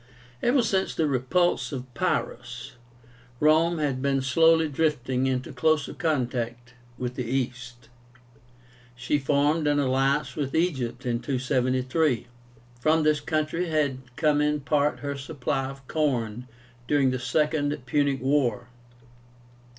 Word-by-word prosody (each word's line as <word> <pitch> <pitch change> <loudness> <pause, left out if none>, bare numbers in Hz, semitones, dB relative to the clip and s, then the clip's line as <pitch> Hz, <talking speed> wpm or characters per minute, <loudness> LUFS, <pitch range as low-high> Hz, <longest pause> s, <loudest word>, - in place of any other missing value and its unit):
Ever 245 +1 +3
since 195 -4 0
the 160 - +1
repulse 145 +8 +1
of 130 -2 -7
Pyrrhus, 120 +2 -3 0.7
Rome 160 +3 +4
had 140 -4 -1
been 135 -1 +1
slowly 160 +4 +4
drifting 135 -4 0
into 130 -1 -2
closer 155 -2 +1
contact 125 -5 -2 0.2
with 125 -1 -3
the 125 - -3
East. 125 -1 -4 1.1
She 120 +4 0
formed 145 +3 +1
an 145 0 +2
alliance 135 +1 +1
with 140 -3 -3
Egypt 135 -7 -1
in 120 -1 0
273. 130 +2 0 0.5
From 155 +5 +3
this 150 -1 +3
country 155 +3 -1
had 145 -4 0 0.2
come 150 -1 +2
in 150 0 +1
part 145 +2 +1
her 140 0 -3
supply 140 -1 -3
of 135 -1 -12
corn 125 -6 -1 0.4
during 140 -2 +3
the 130 - -2
Second 150 +3 0
Punic 140 0 +1
War. 130 -4 +1
140 Hz, 125 wpm, -26 LUFS, 125-155 Hz, 1.1 s, Rome